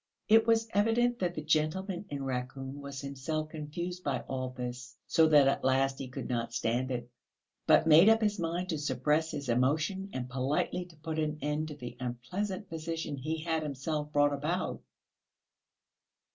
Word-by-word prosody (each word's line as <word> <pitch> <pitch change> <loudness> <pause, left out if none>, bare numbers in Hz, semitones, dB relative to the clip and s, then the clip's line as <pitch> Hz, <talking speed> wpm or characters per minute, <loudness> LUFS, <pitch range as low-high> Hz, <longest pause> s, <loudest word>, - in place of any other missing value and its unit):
It 225 +1 +6
was 225 0 +3
evident 235 +4 +2
that 175 -1 -1
the 155 - -4
gentleman 175 +5 0
in 140 -1 -4
raccoon 135 +2 -4
was 140 -1 -6
himself 140 +3 -3
confused 170 +4 -5
by 135 -4 -1
all 130 -1 -3
this, 125 -1 -6
so 160 -1 +4
that 145 -3 +6
at 135 - +1
last 135 +1 +2
he 135 - -4
could 125 - -6
not 115 -1 -2
stand 120 +3 0
it, 120 -2 -3 0.6
but - - +6
made 165 +6 +8
up 225 0 +6
his 210 -1 +1
mind 170 +2 -2
to 160 -4 -1
suppress 150 +2 +1
his 140 -3 -5
emotion 155 - +1
and 125 -1 -4
politely 135 +7 -1
to 175 -2 -17
put 160 +1 -4
an 155 -1 -1
end 150 +1 -1
to 150 - -7
the 120 -3 -8
unpleasant 180 - -4
position 165 -2 -4
he 155 +4 -3
had 160 -1 0
himself 150 +1 -3
brought 145 0 +3
about. 155 +6 -2
150 Hz, 175 wpm, -31 LUFS, 135-170 Hz, 0.6 s, made